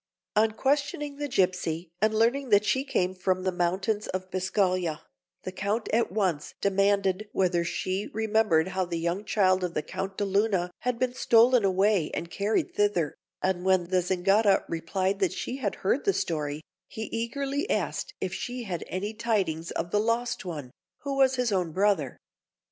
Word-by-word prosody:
On 220 +1 +4
questioning 285 +3 -1
the 290 0 -3
gipsy 180 - 0
and 215 0 +4
learning 240 +5 +1
that 205 0 +5
she 265 +4 +1
came 185 -9 0
from 185 0 -1
the 185 - +1
mountains 185 +4 -1
of 185 0 -4
Biscaglia, 185 -3 0 0.4
the 185 - -4
Count 200 +4 -2
at 230 -3 +2
once 175 -8 -1
demanded 200 0 +1
whether 180 -2 +2
she 185 +3 -2
remembered 215 -6 +2
how 190 0 -1
the 170 -1 -3
young 170 +4 -1
child 185 -3 +2
of 175 -1 -3
the 155 - 0
Count 195 0 -5
de 205 - 0
Luna 195 -3 +1
had 250 -1 -1
been 255 0 0
stolen 240 -1 +5
away 190 -2 +2
and 170 - -5
carried 220 - 0
thither; 415 +1 +1 0.3
and 185 -1 0
when 185 -2 +2
the 185 -1 +3
Zingara 195 +3 +3
replied 185 +4 -1
that 190 - +1
she 255 - -4
had 220 -7 -2
heard 250 +8 +2
the 395 - +2
story, 150 - -2 0.3
he 220 - -6
eagerly 275 +5 -2
asked - - -2
if 185 -1 -3
she 245 +5 -4
had 180 -6 -4
any 200 +4 -3
tidings 195 -8 -1
of 170 +1 -3
the 210 - +2
lost 230 +2 0
one, 150 -8 -6 0.3
who 280 -1 -3
was 265 -1 +4
his 250 -3 0
own 180 -5 0
brother. 190 -9 +1
195 Hz, 175 wpm, -27 LUFS, 180-225 Hz, 0.4 s, that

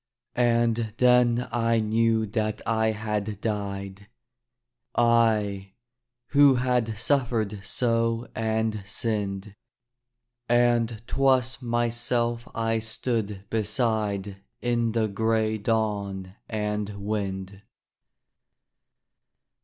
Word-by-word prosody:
And 115 -2 +1
then 125 -1 +4
I 115 -1 +2
knew 110 +1 +2
that 110 0 -2
I 110 0 +1
had 105 -2 -2
died, 100 -2 -4 0.9
I, 110 -5 +2 0.6
who 140 -2 +6
had 125 -3 0
suffered 115 -5 0
so 115 +2 0
and 110 -1 -1
sinned 100 -2 -3 1.0
And 120 -2 +2
'twas 130 -1 +2
myself 120 0 0
I 115 0 0
stood 110 -3 -3
beside 105 -3 -1 0.2
In 120 -2 0
the 115 -1 +1
gray 110 +1 0
dawn 100 -4 -1 0.2
and 105 -1 -2 0.2
wind. 100 -2 -3
110 Hz, 85 wpm, -26 LUFS, 105-120 Hz, 1.0 s, who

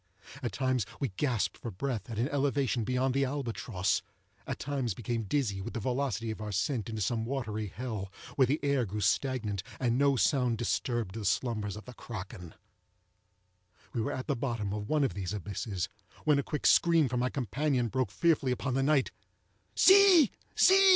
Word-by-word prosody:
At 120 -7 -3
times 130 -1 +1 0.2
we 135 - 0
gasped 115 +3 -1
for 120 - -5
breath 115 +1 -4
at 115 - -5
an 120 +4 +1
elevation 140 -4 +1
beyond 125 +2 0
the 135 +1 +2
albatross—at 115 -8 -3
times 130 -7 -2
became 115 0 -3
dizzy 105 -5 0
with 115 - -6
the - - -1
velocity 120 -2 -1
of 110 - -7
our 105 - -4
descent 105 +3 -1
into 110 -2 -2
some 110 +3 0
watery 110 -4 -3
hell, 105 -2 -5 0.2
where 130 -2 +4
the 145 +5 +1
air 140 -3 +2
grew 105 +2 -4
stagnant, 105 -2 0 0.2
and 125 -1 +1
no 140 -1 +4
sound 125 +1 +2
disturbed 120 -3 -1
the 110 0 -5
slumbers 105 0 -1
of 105 - -10
the 125 - -10
kraken. 90 -8 -8 1.4
We 120 - -1
were 110 - -1
at 130 - -4
the - - 0
bottom 115 -5 -2
of 105 0 -4
one 155 -2 +2
of 135 - 0
these 95 0 -4
abysses, 100 -2 -3 0.4
when 150 -2 +4
a - - +3
quick 150 +2 -4
scream 165 -4 +5
from 125 0 -1
my 125 +1 +1
companion 130 +1 0
broke 130 +2 -1
fearfully 160 -6 +2
upon 130 +1 -1
the 135 - +1
night. 140 -1 +2 0.6
"See! 380 - +7 0.2
see!" 390 +1 +7
120 Hz, 180 wpm, -30 LUFS, 105-135 Hz, 1.4 s, See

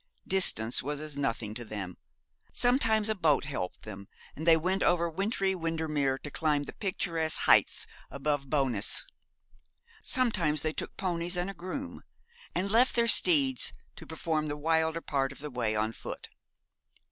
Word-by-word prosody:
Distance 125 - +4
was 145 +2 -4
as 155 -1 -5
nothing 115 -6 -2
to 120 +2 -5
them 100 -5 -6 0.6
sometimes 225 -4 +3
a 220 - +2
boat 165 -8 +2
helped 135 -11 -5
them, 100 -2 -9 0.3
and 160 +3 -6
they 165 -1 +7
went 185 +4 -1
over 170 -1 +2
wintry 195 +3 -1
Windermere 160 -6 -1
to 145 +2 -9
climb 150 -2 0
the - - -8
picturesque 165 -5 -1
heights - - +4 0.2
above 140 -1 -2
Bowness. 130 -8 +1 1.0
Sometimes 180 - +1
they 155 0 -1
took - - -6
ponies, 175 -1 -2
and 180 +2 -2
a - - -11
groom, 225 +10 -7 0.5
and 195 +2 -1
left 240 +4 +4
their 235 -1 +3
steeds 140 - +4 0.2
to - - -12
perform 160 -1 -2
the 145 0 -4
wilder 160 +1 0
part 135 -3 -1
of 140 - -11
the 150 0 -7
way 115 -3 -1
on 110 +1 0
foot. - - -8
155 Hz, 160 wpm, -29 LUFS, 135-180 Hz, 1.0 s, they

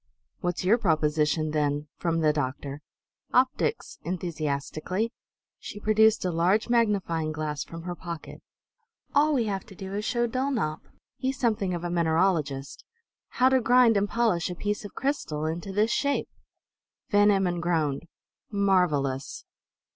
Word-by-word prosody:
"What's 175 0 -2
your 215 +6 +4
proposition, 155 -4 +1
then?" 150 -1 0
from 165 -1 -1
the 155 -1 +3
doctor. 140 0 -3 0.5
"Optics!" 260 - +1
enthusiastically. 170 - -2 0.5
She 205 - -8
produced 215 0 +3
a 180 - +1
large 180 +8 +2
magnifying 195 -9 +1
glass 150 -1 -3
from 165 0 -9
her 175 0 -4
pocket. 170 -2 -8 0.7
"All 295 +2 +4
we 245 - +2
have 195 -2 -2
to 195 - -13
do 190 +1 -7
is 205 +1 -2
to - - +1
show 240 0 +1
Dulnop 235 - -1 0.4
he's 260 +1 -2
something 210 -7 0
of 170 - -5
a 175 - -2
mineralogist 160 -5 0 0.5
how 255 +1 +5
to 260 -1 +3
grind 240 -1 +5
and 200 0 +1
polish 220 -9 +1
a 180 - -4
piece 205 +4 -2
of 205 - -10
crystal 160 - -2
into 170 +4 -3
this 210 +4 +2
shape!" 280 +2 0 0.8
Van 205 0 +5
Emmon 190 -3 +2
groaned. 165 -3 0 0.4
"Marvelous! 180 -10 +1
180 Hz, 145 wpm, -27 LUFS, 155-220 Hz, 0.8 s, how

